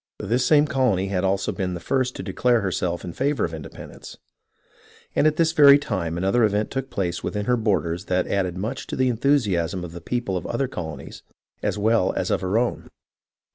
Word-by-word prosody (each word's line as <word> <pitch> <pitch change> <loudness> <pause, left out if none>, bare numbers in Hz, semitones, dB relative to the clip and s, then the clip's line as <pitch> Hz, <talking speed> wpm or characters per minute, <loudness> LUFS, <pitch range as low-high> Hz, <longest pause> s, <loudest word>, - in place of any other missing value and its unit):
This 120 +5 +1
same 150 +3 +5
colony 120 -9 +1
had 95 -2 -1
also 95 0 0
been 90 -2 -3
the - - -5
first 130 +6 -1
to - - -6
declare 120 -2 +1
herself 90 -2 -2
in 90 -2 -6
favour 140 - 0
of 80 - -5
indepen 80 -3 -9
dence, - - -12 1.0
and 155 - +4
at 155 - +2
this 160 0 +2
very 145 -3 +8
time 95 - -3
another 95 +7 +2
event 105 0 +1
took 135 0 -3
place 90 -4 -3
within 105 +1 -3
her 125 - +2
borders 90 -6 -1
that 90 0 0
added 90 -3 -1
much 110 +8 -4
to - - -4
the 130 -1 +2
enthusiasm 105 - +1
of 85 - -7
the 85 0 -9
people 120 0 -2
of - - -5
other 130 +3 -1
colonies 80 - -7 0.4
as - - -1
well 110 -2 +2
as - - -2
of - - +1
her 95 +3 0
own. 120 +1 -1
105 Hz, 205 wpm, -23 LUFS, 90-125 Hz, 1.0 s, very